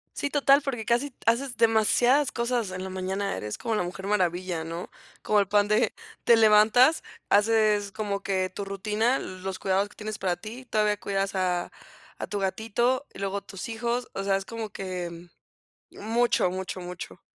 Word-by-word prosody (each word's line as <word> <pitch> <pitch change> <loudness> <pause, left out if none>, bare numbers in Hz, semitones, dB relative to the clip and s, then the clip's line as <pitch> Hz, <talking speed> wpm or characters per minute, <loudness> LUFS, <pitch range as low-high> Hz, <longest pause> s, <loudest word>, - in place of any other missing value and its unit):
Sí, 285 - -2
total 280 0 +4
porque 250 -5 -3
casi 250 +3 0
haces 245 +3 +1
demasiadas 240 +5 +4
cosas 235 -4 -1
en 185 0 -5
la 190 - -5
mañana. 190 +2 -2
Eres 105 0 -5
como 225 -2 -2
la 195 - +1
Mujer 190 +2 -6
Maravilla, 180 -4 0
¿no? 165 +2 -6 0.3
Como 210 -1 +2
el 200 - +1
pan 205 0 +3
de 215 +3 +2 0.3
te 235 - +7
levantas, 225 +7 +5 0.3
haces 210 -1 +3
como 200 -2 -3
que 185 -1 -1
tu 200 +1 -6
rutina, 210 +6 0
los 185 0 -6
cuidados 195 +1 +1
que - - -19
tienes 215 0 -6
para 180 -2 0
ti. 230 +7 -9
Todavía 210 -2 +1
cuidas 195 0 -1
a 180 -2 0 0.5
a - - -5
tu 205 - -3
gatito 225 +7 0
y - - -11
luego 195 0 -2
tus 195 +1 -7
hijos. 235 +2 -2
O 195 - -3
sea, 195 -1 +2
es 195 0 -2
como 230 -2 -5
que 175 -3 -6 0.6
mucho, 230 -3 +1
mucho, 185 0 -5
mucho. 180 0 -8
205 Hz, 175 wpm, -27 LUFS, 190-230 Hz, 0.6 s, te